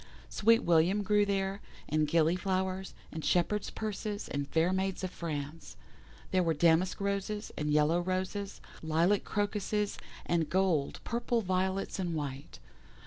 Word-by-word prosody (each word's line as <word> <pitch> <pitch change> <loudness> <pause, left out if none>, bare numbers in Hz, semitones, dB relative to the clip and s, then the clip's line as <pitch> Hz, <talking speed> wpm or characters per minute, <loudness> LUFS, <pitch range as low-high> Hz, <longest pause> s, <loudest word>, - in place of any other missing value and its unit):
Sweet 230 +2 +4
william 175 +5 +3
grew 205 0 +3
there, 195 0 -1 0.3
and 155 +1 +1
Gilly 165 +2 +3
flowers, 190 0 -2 0.2
and 160 -1 -6
Shepherds' 195 +4 +1
purses, 210 -1 -4
and 140 0 -2
Fair 165 +3 +2
maids 190 0 -1
of 185 - -2
France. 155 -1 -5 0.6
There 185 - +3
were 165 -2 +1
damask 170 +4 +3
Roses, 200 +1 -2
and 150 0 -2
yellow 150 +3 +3
Roses, 185 +2 -3 0.2
lilac 165 +5 +2
Crocuses, 205 0 -1 0.3
and 165 -3 +1
gold, 175 -5 +1
purple 235 0 0
Violets 190 +1 -1
and 175 -3 -1
white. 140 -2 -5
185 Hz, 140 wpm, -31 LUFS, 160-200 Hz, 0.6 s, Sweet